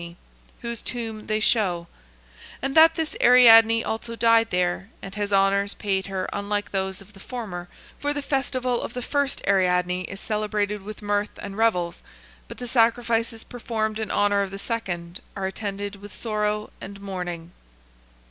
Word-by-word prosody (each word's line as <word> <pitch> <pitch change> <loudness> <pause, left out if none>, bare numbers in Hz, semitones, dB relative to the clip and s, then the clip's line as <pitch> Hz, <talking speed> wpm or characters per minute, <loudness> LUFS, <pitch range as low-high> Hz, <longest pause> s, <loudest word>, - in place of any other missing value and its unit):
2 170 0 -9 0.5
whose 235 -1 -4
tomb 225 -3 -5
they 215 0 +1
show; 190 -6 +2 0.7
and 270 +1 -2
that 325 +1 +7
this 320 -2 -2
Ariadne 230 -2 +8
also 230 +1 -4
died 230 0 +4
there, 180 +2 0
and 195 - -9
has 205 -1 -3
honours 200 0 +2
paid 195 -2 -1
her 190 -1 -3
unlike 205 0 -2
those 190 0 -2
of 200 +2 -17
the 195 - -15
former, 190 -7 -6 0.3
for 290 - 0
the 290 -1 -2
festival 255 -3 -1
of 235 - -6
the 250 - -3
first 285 +1 0
Ariadne 180 -2 +2
is 200 - -7
celebrated 210 -1 -1
with 210 +2 -9
mirth 205 0 -1
and 200 -1 -7
revels, 180 -6 +1 0.5
but - - -9
the 250 - -6
sacrifices 230 -1 +1
performed 220 -3 -3
in 220 -2 -3
honour 205 0 +2
of 200 - -2
the 195 - -7
second 180 -6 -4
are 195 - -3
attended 200 0 -4
with 205 0 -12
sorrow 210 -1 -2
and 200 0 -8
mourning. 175 -4 -5
210 Hz, 165 wpm, -24 LUFS, 195-230 Hz, 0.7 s, Ariadne